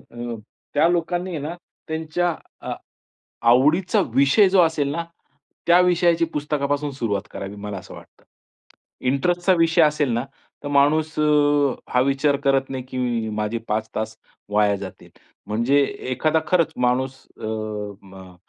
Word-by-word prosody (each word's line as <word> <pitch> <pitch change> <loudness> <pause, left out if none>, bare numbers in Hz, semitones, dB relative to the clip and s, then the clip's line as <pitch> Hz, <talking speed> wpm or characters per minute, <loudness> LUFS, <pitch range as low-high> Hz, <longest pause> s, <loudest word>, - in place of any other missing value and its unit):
अ, 120 -1 -5 0.3
त्या 150 +3 +4
लोकांनी 175 +1 -1
आहे 165 - -3
ना 155 +4 -5 0.3
त्यांच्या 160 +2 -1 0.3
अ, - - -4 0.8
आवडीचा 155 +9 +3
विषय 140 +9 +5
जो 185 -1 +5
असेल 160 -4 +1
ना, 170 +2 -3 0.6
त्या 175 +1 +6
विषयाची 175 -2 +3
पुस्तकापासून 145 0 -1
सुरुवात 105 -6 -2
करावी 100 +1 -6
मला 100 -1 -6
असं - - -12
वाटतं. - - -16 0.8
इंटरेस्टचा 175 +7 +2
विषय 165 0 +4
असेल 150 -3 +2
ना 120 +3 -1 0.4
तर - - -3
माणूस 150 +2 +2
अ, - - +3 0.7
हा 125 - +4
विचार 140 +2 +2
करत 135 -1 +2
नाही 130 -1 -4
की 120 -3 -2
माझे 105 +2 -1
5 110 +1 -1
तास 110 0 -3 0.3
वाया 105 -1 +3
जातील. 95 -2 -10 0.4
म्हणजे 120 +7 +2 0.3
एखादा 155 +4 +1
खरंच 165 -2 +2
माणूस 130 +1 -1 0.2
अ, - - -7 0.6
म 95 -2 -13
140 Hz, 140 wpm, -22 LUFS, 120-160 Hz, 0.8 s, त्या